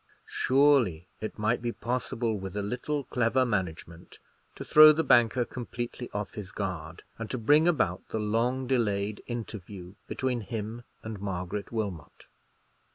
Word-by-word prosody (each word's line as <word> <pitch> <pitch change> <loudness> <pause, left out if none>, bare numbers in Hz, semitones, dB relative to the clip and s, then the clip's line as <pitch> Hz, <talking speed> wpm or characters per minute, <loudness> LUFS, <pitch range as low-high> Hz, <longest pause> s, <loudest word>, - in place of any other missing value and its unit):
Surely 130 - +3
it 110 - -5
might 110 +3 +1
be 120 0 -1
possible, 120 -1 -2
with 95 0 -6
a 100 - -1
little 125 +7 -2
clever 125 +1 +1
management, 90 -5 -4 0.4
to - - -7
throw 155 0 +9
the 160 +2 +1
banker 120 -1 +4
completely 120 0 -6
off 105 -1 -4
his 105 -2 -7
guard, 90 -5 -5 0.2
and 115 - -5
to 130 - -2
bring 145 +8 +4
about 95 - +1
the - - -2
long 115 +5 0
delayed 105 -5 0
interview 100 -6 -7
between 125 -2 -1
him 110 +1 -5 0.2
and 110 -3 -6
Margaret 95 +1 -4
Wilmot. 100 -9 -5
110 Hz, 145 wpm, -28 LUFS, 100-125 Hz, 0.4 s, throw